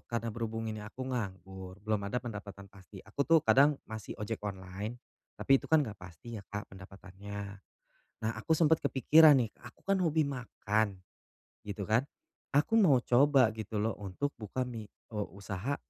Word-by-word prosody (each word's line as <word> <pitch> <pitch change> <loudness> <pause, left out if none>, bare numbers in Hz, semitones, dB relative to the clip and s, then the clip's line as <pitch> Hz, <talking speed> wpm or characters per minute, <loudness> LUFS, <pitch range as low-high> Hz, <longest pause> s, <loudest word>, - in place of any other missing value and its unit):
karena 115 -1 -2
berhubung 115 0 -3
ini 110 -1 -4
aku 110 +5 -7
nganggur, 95 -4 -5
belum 110 -1 +1
ada 115 - -2
pendapatan 100 -3 -8
pasti, 95 0 -13
aku 105 +7 -8
tuh 165 +3 +6
kadang 145 +1 +5
masih 110 -2 -7
ojek 105 +1 -4
online, 100 +3 -5 0.4
tapi 135 0 +4
itu - - -11
kan 155 -2 +5
nggak 105 -4 -8
pasti 100 +5 -9
ya, - - -13
Kak, 105 -1 -6
pendapatannya. 100 +1 -9 0.6
Nah, 110 - +2
aku 160 +8 +2
sempat 160 -1 +4
kepikiran 150 +3 +6
nih, 120 -5 +1
aku - - -14
kan 195 -1 +2
hobi 160 -3 +2
makan 110 -6 -1 0.7
gitu 100 0 -4
kan, 115 +7 +2 0.5
aku 225 +10 +4
mau 175 -10 +6
coba 130 -1 +5
gitu 110 -1 -7
loh 110 +2 +1
untuk 100 +9 -3
buka 115 +4 -2
mi 115 -4 -7 0.2
o 105 -2 -4
usaha, 100 +7 -3
110 Hz, 165 wpm, -32 LUFS, 100-130 Hz, 0.7 s, tuh